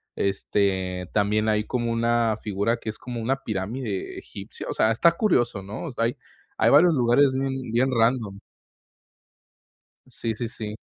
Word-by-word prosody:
este, 95 Hz, -2 st, -1 dB
también 105 Hz, +1 st, +2 dB
hay 105 Hz, -1 st, +2 dB
como 120 Hz, -2 st, -1 dB
una 115 Hz, -1 st, +1 dB
figura 105 Hz, +3 st, 0 dB
que 110 Hz, -, -6 dB
es 110 Hz, -, -6 dB
como 120 Hz, -2 st, -6 dB
una 135 Hz, +4 st, 0 dB
pirámide 105 Hz, +1 st, -4 dB
egipcia. -, -, -8 dB
O -, -, -1 dB
sea, 110 Hz, -, +3 dB
está 165 Hz, +9 st, +4 dB
curioso, 120 Hz, -, +1 dB
¿no? 100 Hz, -, -7 dB
O 160 Hz, -, -5 dB
sea, 115 Hz, -2 st, 0 dB
hay 120 Hz, -, -2 dB, 0.4 s
hay -, -, +4 dB
varios 165 Hz, +4 st, +6 dB
lugares 130 Hz, +2 st, +4 dB
bien 135 Hz, -2 st, -2 dB
bien 130 Hz, +3 st, +2 dB
random. 115 Hz, -4 st, +1 dB, 1.7 s
Sí, 115 Hz, -3 st, -4 dB
sí, 120 Hz, +1 st, -4 dB
sí. 110 Hz, -2 st, -6 dB
115 Hz, 160 wpm, -25 LUFS, 105-125 Hz, 1.7 s, varios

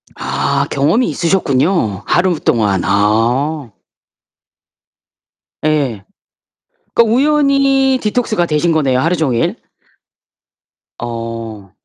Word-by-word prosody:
아 140 Hz, 0 st, -1 dB
경험이 155 Hz, -, +1 dB
있으셨군요, 165 Hz, -, 0 dB
하루 175 Hz, -2 st, +1 dB
동안. 105 Hz, -5 st, +1 dB
아. 115 Hz, +8 st, 0 dB, 2.0 s
예. 140 Hz, -10 st, 0 dB, 0.9 s
그러니까 230 Hz, -1 st, +3 dB
우연히 275 Hz, -2 st, +2 dB
디톡스가 215 Hz, -4 st, 0 dB
되신 160 Hz, +1 st, 0 dB
거네요, 135 Hz, -5 st, +1 dB
하루 165 Hz, +5 st, +1 dB
종일. 130 Hz, -8 st, 0 dB, 1.4 s
어. 115 Hz, -4 st, -6 dB
150 Hz, 180 characters per minute, -15 LUFS, 115-195 Hz, 2.0 s, 그러니까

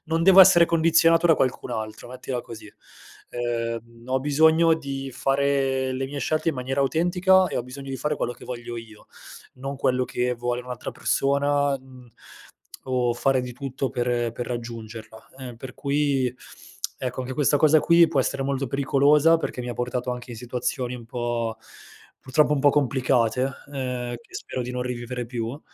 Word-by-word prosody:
non 165 Hz, 0 st, 0 dB
devo 190 Hz, +2 st, +8 dB
essere 175 Hz, -2 st, +8 dB
condizionato 165 Hz, 0 st, +4 dB
da 165 Hz, -, +6 dB
qualcun 130 Hz, -2 st, -1 dB
altro, 110 Hz, -1 st, -5 dB
mettila 125 Hz, 0 st, -5 dB
così. 110 Hz, -2 st, -11 dB, 0.6 s
Ehm, 115 Hz, -1 st, -4 dB
ho 130 Hz, +1 st, 0 dB
bisogno 160 Hz, +3 st, +4 dB
di 135 Hz, -3 st, -5 dB
fare 135 Hz, -1 st, 0 dB
le 130 Hz, +1 st, -2 dB
mie 140 Hz, +2 st, -5 dB
scelte 155 Hz, +3 st, 0 dB
in -, -, -7 dB
maniera 130 Hz, +2 st, -1 dB
autentica 180 Hz, +5 st, +3 dB
e -, -, -4 dB
ho 120 Hz, -, -1 dB
bisogno 135 Hz, +2 st, -9 dB
di 135 Hz, -, -3 dB
fare 150 Hz, +2 st, -2 dB
quello 120 Hz, -, -2 dB
che 120 Hz, -, -14 dB
voglio 120 Hz, -1 st, -6 dB
io. 110 Hz, -2 st, -11 dB, 0.5 s
Non 135 Hz, +2 st, -6 dB
quello 130 Hz, -1 st, +1 dB
che 125 Hz, 0 st, -1 dB
vuole 120 Hz, +1 st, -2 dB
un'altra 125 Hz, -1 st, -6 dB
persona, 140 Hz, 0 st, +1 dB
mhmm, 130 Hz, -1 st, -16 dB, 0.8 s
o 125 Hz, -2 st, 0 dB
fare 130 Hz, +2 st, +2 dB
di 125 Hz, -1 st, -7 dB
tutto 135 Hz, 0 st, -3 dB
per 120 Hz, -1 st, -1 dB
per 120 Hz, +1 st, -5 dB
raggiungerla, 115 Hz, -2 st, -7 dB
ehm, 125 Hz, -3 st, -8 dB
per 130 Hz, +2 st, -9 dB
cui 140 Hz, -3 st, 0 dB, 0.7 s
ecco, 125 Hz, 0 st, -3 dB
anche 130 Hz, +1 st, -5 dB
questa 145 Hz, 0 st, +3 dB
cosa 155 Hz, +1 st, +5 dB
qui 170 Hz, 0 st, +6 dB
può 145 Hz, -5 st, +1 dB
essere 135 Hz, +1 st, -2 dB
molto 135 Hz, -1 st, -2 dB
pericolosa, 145 Hz, +4 st, +4 dB
perché 145 Hz, -, -4 dB
mi 125 Hz, -, -5 dB
ha -, -, -2 dB
portato 125 Hz, 0 st, -2 dB
anche 125 Hz, 0 st, -8 dB
in 115 Hz, -, -7 dB
situazioni 125 Hz, +1 st, -3 dB
un 120 Hz, -2 st, -9 dB
po' 115 Hz, -1 st, -3 dB, 0.6 s
purtroppo 150 Hz, +3 st, +2 dB
un 145 Hz, -, +1 dB
po' 145 Hz, +1 st, +5 dB
complicate, 130 Hz, -3 st, +1 dB, 0.2 s
uhm, 125 Hz, -3 st, -4 dB
che -, -, -22 dB
spero 130 Hz, -, -4 dB
di 125 Hz, -, -5 dB
non 125 Hz, 0 st, -3 dB
rivivere 125 Hz, 0 st, -4 dB
più, 120 Hz, +3 st, -5 dB
130 Hz, 175 wpm, -24 LUFS, 120-140 Hz, 0.8 s, devo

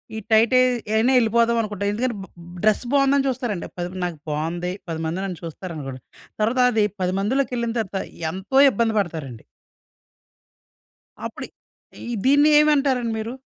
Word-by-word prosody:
ఈ -, -, -4 dB
టైట్ 220 Hz, +3 st, +4 dB
అయి 255 Hz, -, +5 dB, 0.3 s
అయినా 235 Hz, +4 st, +3 dB
ఎళ్ళిపోదాం 235 Hz, 0 st, +2 dB
అనుకుంటాం. 205 Hz, -2 st, -3 dB
ఎందుకంటే 235 Hz, +1 st, -1 dB
బ్ -, -, -11 dB, 0.4 s
డ్రెస్ 215 Hz, +3 st, +3 dB
బాగుందని 275 Hz, 0 st, +3 dB
చూస్తారండి. 240 Hz, -8 st, -3 dB
పది 175 Hz, 0 st, -3 dB, 0.2 s
నాకు 175 Hz, -3 st, -4 dB
బాగుంది 170 Hz, +4 st, -2 dB, 0.2 s
10 160 Hz, -1 st, -3 dB
మంది 165 Hz, +3 st, -2 dB
నన్ను 185 Hz, -4 st, -5 dB
చూస్తారనుకోండి. 150 Hz, -6 st, -7 dB, 0.4 s
తర్వాత 230 Hz, +4 st, +1 dB
అది 215 Hz, -2 st, +2 dB, 0.2 s
10 180 Hz, 0 st, 0 dB
మందిలోకెళ్ళిన 235 Hz, +1 st, -1 dB
తర్వాత 195 Hz, -2 st, -4 dB, 0.3 s
ఎంతో 190 Hz, +8 st, -2 dB
ఇబ్బంది 225 Hz, +1 st, 0 dB
పడతారండి. 155 Hz, -, -4 dB, 1.8 s
అప్పుడు -, -, -6 dB, 0.6 s
ఈ -, -, -3 dB
దీన్ని 285 Hz, +3 st, +5 dB
ఏమంటారండి 275 Hz, -6 st, +2 dB
మీరు? 225 Hz, +3 st, -4 dB
220 Hz, 140 wpm, -22 LUFS, 180-250 Hz, 1.8 s, అయి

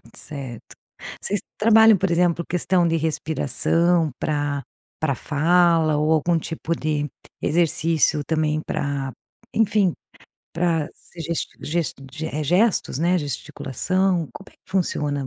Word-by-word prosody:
Certo. 135 Hz, -6 st, -8 dB, 0.5 s
Vocês 205 Hz, -, -1 dB, 0.2 s
trabalham, 220 Hz, 0 st, +6 dB
por 190 Hz, +1 st, 0 dB
exemplo, 170 Hz, 0 st, +2 dB
questão 180 Hz, 0 st, +2 dB
de 165 Hz, -, +1 dB
respiração 160 Hz, +1 st, +1 dB
pra 145 Hz, -2 st, -1 dB, 0.4 s
pra 155 Hz, -3 st, +1 dB
fala 165 Hz, +2 st, +3 dB
ou 150 Hz, +2 st, +1 dB
algum 165 Hz, +2 st, +2 dB
tipo 165 Hz, +1 st, -3 dB
de 150 Hz, -2 st, -1 dB, 0.3 s
exercício 160 Hz, -2 st, +2 dB
também 155 Hz, -1 st, 0 dB
pra 140 Hz, -2 st, -2 dB, 0.4 s
enfim, 210 Hz, -4 st, +3 dB, 0.6 s
pra 165 Hz, -3 st, 0 dB
se 175 Hz, -, -15 dB
gest 165 Hz, +1 st, -2 dB
gest 165 Hz, -1 st, -1 dB, 0.2 s
gest 160 Hz, -1 st, -5 dB
eh, 155 Hz, 0 st, -1 dB
gestos, 180 Hz, -, +2 dB
né, 175 Hz, +3 st, +2 dB
gesticulação. 170 Hz, +4 st, -1 dB
Como 195 Hz, -, -11 dB
é -, -, -23 dB
que -, -, -26 dB
funciona? 145 Hz, -7 st, -1 dB
160 Hz, 125 wpm, -23 LUFS, 150-175 Hz, 0.6 s, trabalham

